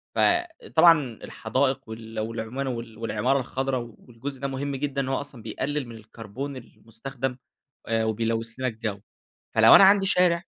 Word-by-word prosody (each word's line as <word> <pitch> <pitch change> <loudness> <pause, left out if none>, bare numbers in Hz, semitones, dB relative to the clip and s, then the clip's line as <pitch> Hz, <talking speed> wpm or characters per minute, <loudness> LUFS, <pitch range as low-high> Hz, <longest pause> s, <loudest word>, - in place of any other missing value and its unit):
فطبعًا 170 - +3
الحدائق 130 +2 -1
وال 110 0 -7
والعما 115 +4 -3
وال 115 -2 -6
والعمارة 125 +4 0
الخضرا، 130 +1 -2
و 120 -2 -7
والجزء 130 +3 -8
ده 140 - -1
مهم 135 +1 -3
جدًا، 140 0 -2
إن 130 - -4
هو 135 - 0
أصلًا 140 -5 -10
بيقلل 135 +5 -3
من 115 - -9
الكربون 115 +5 -7
المستخدم 125 +3 -6 0.5
آآ، 115 -1 +1
وبيلوث 115 +1 -1
لنا 130 - 0
الجو، 110 -3 -4 0.6
فلو - - +8
أنا - - +9
عندي 195 0 +6
شارع، 180 -2 +3
130 Hz, 155 wpm, -25 LUFS, 115-140 Hz, 0.6 s, أنا